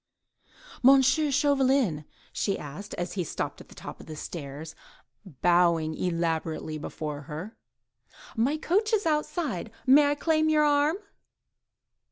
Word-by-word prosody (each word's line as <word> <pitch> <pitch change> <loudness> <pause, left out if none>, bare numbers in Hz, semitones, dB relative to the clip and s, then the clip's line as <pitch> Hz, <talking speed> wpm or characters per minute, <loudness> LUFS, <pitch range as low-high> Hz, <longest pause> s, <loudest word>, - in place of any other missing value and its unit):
"M. 270 +1 +7
Chauvelin," 270 - +2 0.3
she 195 - 0
said, 150 +8 -8
as 175 +1 -4
he 185 - -1
stopped 155 - -4
on - - -14
the - - -16
top - - -9
of - - -13
the 155 - -7
stairs, 155 0 -7 0.7
bowing 170 -3 +3
elaborately 160 -2 -2
before 150 -1 -5
her, 180 +9 -6 0.8
"my 255 +7 +1
coach 410 +8 0
is 420 -2 +2
outside; 300 - -1 0.2
may 285 +2 +6
I 290 - +1
claim 315 +1 +1
your 305 -1 +4
arm?" 290 +2 +3
225 Hz, 130 wpm, -27 LUFS, -, 0.8 s, M